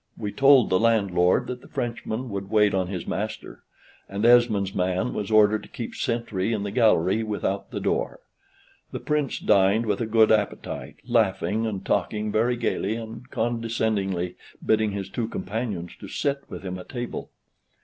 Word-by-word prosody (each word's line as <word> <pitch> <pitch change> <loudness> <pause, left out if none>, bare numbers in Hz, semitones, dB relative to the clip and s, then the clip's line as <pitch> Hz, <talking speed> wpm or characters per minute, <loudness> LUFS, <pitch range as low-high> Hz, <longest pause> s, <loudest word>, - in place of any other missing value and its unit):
We 105 - -4
told 135 -4 +5
the 95 - +4
landlord 100 -6 +3
that 125 0 -6
the - - -15
Frenchman 120 +1 -4
would 100 0 -5
wait 105 -1 +3
on 95 -1 0
his 90 -2 -5
master; 105 +3 -5 0.5
and 100 +3 -2
Esmond's 115 -5 +4
man 95 +6 0
was 105 -2 -3
ordered 110 -1 +4
to - - -14
keep 115 - -6
sentry 115 -3 -1
in 105 -2 -2
the 100 - -3
gallery 110 -3 +3
without 105 -2 -2
the - - -4
door. - - -1 0.7
The - - -4
Prince 150 -3 -1
dined 100 +3 +3
with 105 -1 -1
a 115 - -1
good 110 0 +4
appetite, 105 -2 -1
laughing 110 -1 +1
and 100 -4 -4
talking 105 0 0
very 120 +3 +2
gayly, 110 -2 -1
and 115 +2 -8
condescendingly 110 -6 -1 0.3
bidding 110 0 +3
his 100 -1 -4
two 110 +3 -3
companions 100 -3 -4
to - - -9
sit 140 -1 -2
with - - -8
him 90 -1 -5
at 90 - -11
table. 120 -1 -5
110 Hz, 170 wpm, -25 LUFS, 100-115 Hz, 0.7 s, told